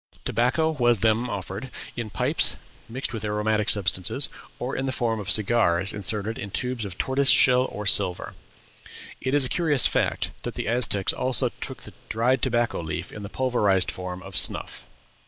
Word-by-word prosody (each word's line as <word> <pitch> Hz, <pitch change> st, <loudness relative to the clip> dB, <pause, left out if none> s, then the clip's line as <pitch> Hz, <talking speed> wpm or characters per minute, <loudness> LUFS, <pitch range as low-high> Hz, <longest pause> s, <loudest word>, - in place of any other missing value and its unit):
Tobacco 135 Hz, +7 st, +1 dB
was 120 Hz, -8 st, +2 dB
then 115 Hz, +3 st, +1 dB
offered, 100 Hz, +4 st, -6 dB, 0.3 s
in 115 Hz, -2 st, -5 dB
pipes, -, -, +2 dB, 0.3 s
mixed 125 Hz, +3 st, -4 dB
with 110 Hz, -1 st, -5 dB
aromatic 105 Hz, 0 st, 0 dB
substances, 100 Hz, +6 st, +1 dB, 0.3 s
or 125 Hz, +2 st, -4 dB
in 135 Hz, -, -2 dB
the -, -, -1 dB
form 115 Hz, -3 st, -1 dB
of 100 Hz, -2 st, -6 dB
cigars 100 Hz, -3 st, +3 dB
inserted 105 Hz, +2 st, -3 dB
in 100 Hz, -, -6 dB
tubes 125 Hz, +1 st, -3 dB
of 95 Hz, -3 st, -8 dB
tortoise 135 Hz, +1 st, +1 dB
shell 125 Hz, -1 st, +5 dB
or 105 Hz, -3 st, -7 dB
silver. 100 Hz, -3 st, +2 dB, 0.9 s
It 130 Hz, +2 st, -1 dB
is 145 Hz, -2 st, +6 dB
a -, -, -1 dB
curious 150 Hz, -3 st, +3 dB
fact -, -, 0 dB
that -, -, -6 dB
the -, -, -4 dB
Aztecs 110 Hz, -4 st, +2 dB
also 130 Hz, -2 st, +1 dB
took -, -, -5 dB
the -, -, -9 dB, 0.2 s
dried 120 Hz, +3 st, +1 dB
tobacco 120 Hz, -6 st, 0 dB
leaf 85 Hz, +2 st, -5 dB
in 105 Hz, -, -9 dB
the 100 Hz, -, -7 dB
pulverized 105 Hz, -8 st, +1 dB
form 90 Hz, 0 st, -7 dB
of 95 Hz, -1 st, -10 dB
snuff. -, -, -1 dB
110 Hz, 175 wpm, -24 LUFS, 100-125 Hz, 0.9 s, is